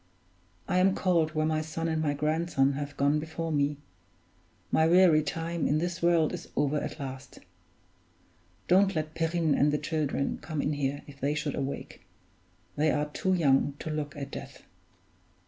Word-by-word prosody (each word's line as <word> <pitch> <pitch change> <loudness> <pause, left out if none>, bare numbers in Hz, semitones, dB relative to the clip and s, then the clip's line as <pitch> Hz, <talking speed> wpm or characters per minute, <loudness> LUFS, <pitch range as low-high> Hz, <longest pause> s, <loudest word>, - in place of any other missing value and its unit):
I 180 - +2
am 190 +1 +4
called 165 -4 +1
where 155 0 +1
my 155 0 +1
son 160 +1 -4
and 160 -1 0
my 145 -2 0
grandson 150 -2 +1
have 145 0 -5
gone 145 +2 +2
before 160 +1 -4
me; 145 -1 +1 0.9
my 160 - +4
weary 175 -2 +6
time 165 +2 -2
in 150 - +2
this 175 +2 -2
world 170 -2 +3
is - - -7
over 145 +1 +1
at - - -4
last. 135 -1 -7 1.3
Don't 190 +1 +4
let 155 0 -2
Perrine 165 -1 +1
and 145 +1 +3
the 150 - +1
children 150 -3 -2
come 155 -3 -5
in 145 +1 0
here, 140 -1 -2
if 140 -1 -14
they 145 +2 0
should 150 -2 -2
awake 140 0 -5 0.7
they 155 +1 +2
are 150 0 0
too 185 +4 0
young 140 -3 +2
to 155 - -5
look 150 -1 -4
at 140 -1 -6
death." - - -9
155 Hz, 170 wpm, -29 LUFS, 145-165 Hz, 1.3 s, weary